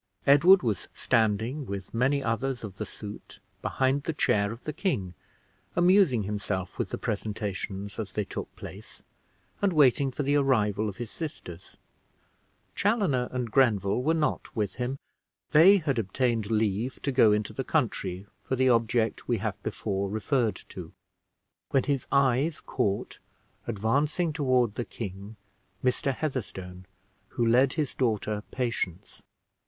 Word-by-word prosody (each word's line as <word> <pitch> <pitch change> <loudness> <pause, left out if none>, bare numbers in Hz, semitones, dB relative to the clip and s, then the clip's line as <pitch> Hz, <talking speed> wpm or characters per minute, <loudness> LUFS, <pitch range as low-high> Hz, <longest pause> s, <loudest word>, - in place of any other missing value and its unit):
Edward 170 +7 +7
was 110 -6 -1
standing, 115 +6 +1
with 100 -1 -6
many 135 +4 +1
others 125 +3 -1
of 100 -3 -7
the 110 - -4
suit, 105 -1 -10 0.2
behind 130 +2 +1
the 160 - -3
chair 100 -8 +1
of 115 +2 -9
the 150 - -4
king, 125 - -1 0.6
amusing 175 - +4
himself 100 -2 -4
with - - -1
the - - -3
presentations 100 -2 -4
as 105 -4 -4
they 105 - -1
took - - -6
place, - - -10 0.6
and 200 -3 +2
waiting 140 -2 +4
for 140 +3 -3
the 140 +1 +2
arrival 110 -7 +2
of 100 - -9
his 120 -2 -6
sisters 95 - -7 1.0
Chaloner 190 - +1
and 125 -3 -3
Grenville 110 -4 +3
were 160 +5 +2
not 155 -2 -1
with 105 -4 -1
him, 125 +2 -2 0.5
they 180 +7 +8
had 145 -9 0
obtained 115 +1 0
leave 110 +2 0
to 140 - 0
go 125 -5 +5
into 105 0 0
the - - -3
country, 90 +2 -1
for 130 - -3
the 130 0 +3
object 115 -1 +1
we 120 - +1
have 105 -1 -4
before 100 -2 -2
referred 110 +2 0
to - - -9 0.8
when 135 - +2
his 140 -2 -1
eyes 140 +3 +2
caught, 105 -7 -2 0.5
advancing 140 - 0
toward 130 -7 +2
the 120 - -3
king, 100 -1 -7 0.5
Mr. 130 +2 +1
Heatherstone, 95 -11 -5 0.4
who 120 - -1
led 125 +3 +4
his 150 -4 -1
daughter, 110 -4 0
Patience. 115 -8 -3
120 Hz, 145 wpm, -28 LUFS, 105-140 Hz, 1.0 s, they